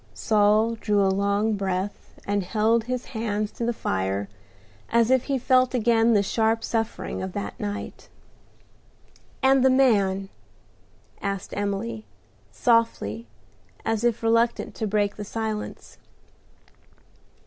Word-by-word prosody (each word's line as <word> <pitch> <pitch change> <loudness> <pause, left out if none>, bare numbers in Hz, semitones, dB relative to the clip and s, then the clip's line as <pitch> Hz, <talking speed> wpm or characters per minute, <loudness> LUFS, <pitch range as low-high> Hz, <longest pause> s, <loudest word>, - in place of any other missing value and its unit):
Saul 215 +1 +3
drew 205 -3 +1
a 190 - +2
long 200 +2 +1
breath, 195 0 -4
and 205 0 0
held 220 +4 +1
his 250 0 -3
hands 215 -2 -2
to - - -6
the - - +2
fire 95 - -2 0.6
as 235 +1 +3
if 260 -1 +3
he 275 -2 0
felt 255 0 +3
again 230 -1 +3
the 200 - +4
sharp 225 +2 +1
suffering 225 0 -3
of 190 -1 -5
that 205 - -5
night. 205 0 -6 1.3
"And 265 -1 +5
the 265 - +6
man?" 200 -7 +3 0.9
asked 195 -2 -4
Emily, 195 - -3 0.5
softly, 115 - +1 0.6
as 225 0 0
if 235 -1 +1
reluctant 230 +1 +1
to 220 - -2
break 205 0 0
the 210 - -5
silence. 215 0 -5
215 Hz, 125 wpm, -25 LUFS, 200-230 Hz, 1.3 s, the